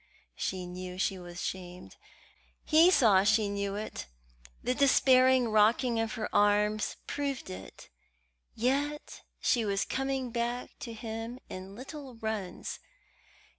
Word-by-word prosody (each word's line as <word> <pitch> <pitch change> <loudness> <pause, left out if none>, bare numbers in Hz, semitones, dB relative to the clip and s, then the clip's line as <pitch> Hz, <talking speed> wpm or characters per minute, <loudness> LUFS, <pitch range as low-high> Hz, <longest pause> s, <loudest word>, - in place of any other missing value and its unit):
She 185 - -3
knew 180 0 -7
she 190 0 0
was 175 0 -7
shamed. 180 -1 -6 0.7
He 325 +3 +6
saw 225 - +5
she 210 0 +3
knew 200 0 -2
it: 210 - -5 0.6
the 250 - +1
despairing 260 -2 +5
rocking 225 +3 +3
of 225 0 -1
her 220 -3 -3
arms 210 +1 +2
proved 280 - -3
it; 95 +1 -10 0.7
yet 280 +5 -1 0.2
she 235 - +2
was 200 -2 0
coming 270 -2 -2
back 240 +1 -2
to 230 - -6
him 225 +1 -6
in 190 +1 -8
little 265 +1 -9
runs. 220 -4 -4
225 Hz, 125 wpm, -30 LUFS, 200-255 Hz, 0.7 s, He